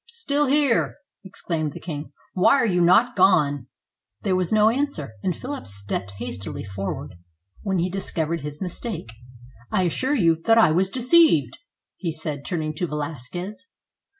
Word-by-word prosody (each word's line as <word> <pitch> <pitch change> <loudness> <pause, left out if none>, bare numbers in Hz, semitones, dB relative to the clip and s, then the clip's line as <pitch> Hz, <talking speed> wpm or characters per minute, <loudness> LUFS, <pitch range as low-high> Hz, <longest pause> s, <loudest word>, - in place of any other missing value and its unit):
"Still 295 -11 0
here!" 280 -3 +2 0.3
exclaimed 165 -5 -3
the - - -8
king. 150 -3 -6
" - - -35
Why 185 +8 +5
are 265 - +3
you 180 -5 +2
not 200 +8 +4
gone? 150 -9 +3 0.3
" 105 - -60
There 190 - +1
was 185 -2 0
no 215 0 +5
answer; 235 - -2
and 180 - -1
Philip 275 +2 -6
stepped 100 -1 -4
hastily 100 -4 -5
for 95 0 -4
ward, - - -9 0.5
when 195 -2 -1
he 175 +1 +1
discovered 170 -4 -2
his 150 +5 -5
mistake. 180 - -5 0.6
"I 185 - +2
assure 260 - +1
you 165 - +3
that 225 0 +5
I 220 -8 +6
was 185 +4 +3
deceived," 280 +9 +4 0.4
he 170 -4 -2
said, 155 -3 -4
turning 155 -2 -2
to 175 - -1
Velasquez. 165 - -5
180 Hz, 165 wpm, -24 LUFS, 150-225 Hz, 0.6 s, I